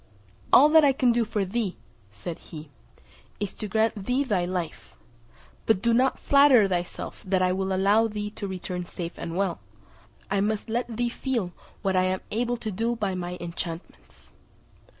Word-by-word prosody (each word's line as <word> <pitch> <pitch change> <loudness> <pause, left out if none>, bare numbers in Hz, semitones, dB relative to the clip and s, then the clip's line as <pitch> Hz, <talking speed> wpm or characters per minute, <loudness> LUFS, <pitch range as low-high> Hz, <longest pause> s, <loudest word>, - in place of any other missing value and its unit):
"All 285 - +8
that 320 0 +7
I 280 -2 +5
can 255 -2 +3
do 235 0 +2
for 210 -3 -1
thee," 200 -1 -2 0.3
said 105 - -7
he, 155 -2 -11 0.7
"is, 205 -2 -3
to 215 - -5
grant 220 -1 0
thee 255 +3 +2
thy 200 -9 0
life; 175 -3 -5 0.7
but 220 -4 +4
do 235 +3 +2
not 255 +3 +3
flatter 280 -7 +6
thyself 175 -2 -4
that 185 -1 +2
I 180 - +3
will 190 +1 -1
allow 200 +4 +3
thee 210 -1 -4
to 205 -1 -5
return 180 -1 -5
safe 170 -1 -6
and 165 +1 -5
well; 190 -3 0 0.7
I 200 0 +2
must 215 +1 -1
let 235 -1 -2
thee 240 0 +1
feel 235 -7 -2 0.3
what 190 -2 +1
I 185 0 +3
am 185 0 -1
able 240 +2 0
to 220 -2 -4
do 230 +5 -1
by 205 -4 -1
my 180 0 -4
enchantments." 170 0 -8
200 Hz, 175 wpm, -26 LUFS, 185-235 Hz, 0.7 s, All